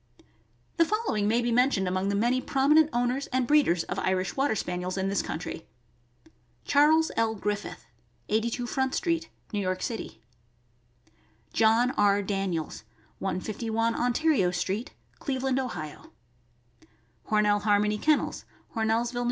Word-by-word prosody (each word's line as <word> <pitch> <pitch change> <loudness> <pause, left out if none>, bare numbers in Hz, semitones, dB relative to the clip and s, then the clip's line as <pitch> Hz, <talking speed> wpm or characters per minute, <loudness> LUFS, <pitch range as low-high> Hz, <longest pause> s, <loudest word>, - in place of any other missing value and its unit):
The 335 - +5
following 410 - 0
may 235 +3 +2
be 240 - 0
mentioned 240 -5 +2
among 185 +2 0
the 200 - 0
many 240 +5 +2
promi 275 +3 +2
nent 315 0 +5
owners 245 +3 0
and 255 0 0
breeders 240 - +3
of - - -4
Irish 185 -1 -1
Water 275 -4 +1
Spaniels 180 -1 -3
in 190 0 0
this 200 - +1
country: 160 0 -6 1.0
Charles 305 +3 +4
L. 225 0 +1
Griffith, 205 0 -4 0.4
82 230 +3 -1
Front 265 +1 -1
street, 335 -2 -1 0.2
New 205 - 0
York 185 -1 -2
City; 225 - -5 1.3
John 225 +3 +4
R. 205 0 +3
Daniels, 190 -5 -3 0.4
151 220 +4 -1
Ontario 245 - +2
street, 185 +6 -2 0.3
Cleveland, 265 -1 -1
Ohio; 175 - -6 1.2
Hornell 210 -1 +3
Harmony 210 0 +2
Kennels, 305 +4 +1 0.3
Hornellsville, 230 +2 0
N. - - 0
225 Hz, 130 wpm, -27 LUFS, 195-260 Hz, 1.3 s, The